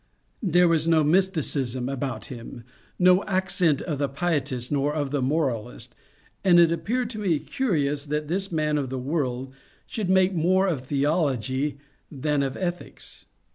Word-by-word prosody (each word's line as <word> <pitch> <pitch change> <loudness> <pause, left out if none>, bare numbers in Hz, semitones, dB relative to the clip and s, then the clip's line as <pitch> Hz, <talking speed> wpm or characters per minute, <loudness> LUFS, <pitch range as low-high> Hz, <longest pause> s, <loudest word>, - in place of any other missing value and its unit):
There 180 -4 +4
was 165 -1 +2
no 160 -2 +4
mysticism 150 -7 +1
about 135 -1 -3
him, 120 -1 -9 0.3
no 180 +1 +5
accent 185 -6 +1
of 150 -5 -3
the 140 -1 0
pietist 135 -5 -2
nor 145 +1 0
of 145 -3 -2
the 145 -2 0
moralist, 125 -4 -1 0.5
and 175 -3 +6
it 170 -1 +6
appeared 240 +8 -1
to 215 - -6
me 185 -7 +1
curious 145 - -1
that 150 +1 -2
this 190 +4 -1
man 150 -2 +1
of 135 -3 -3
the 130 - -3
world 130 -2 -2 0.3
should 210 -5 -4
make 190 0 +4
more 185 +3 +3
of 165 -9 -1
theology 140 -2 0 0.3
than 150 0 0
of 135 -1 -2
ethics. 175 -2 -5
150 Hz, 155 wpm, -25 LUFS, 135-180 Hz, 0.5 s, and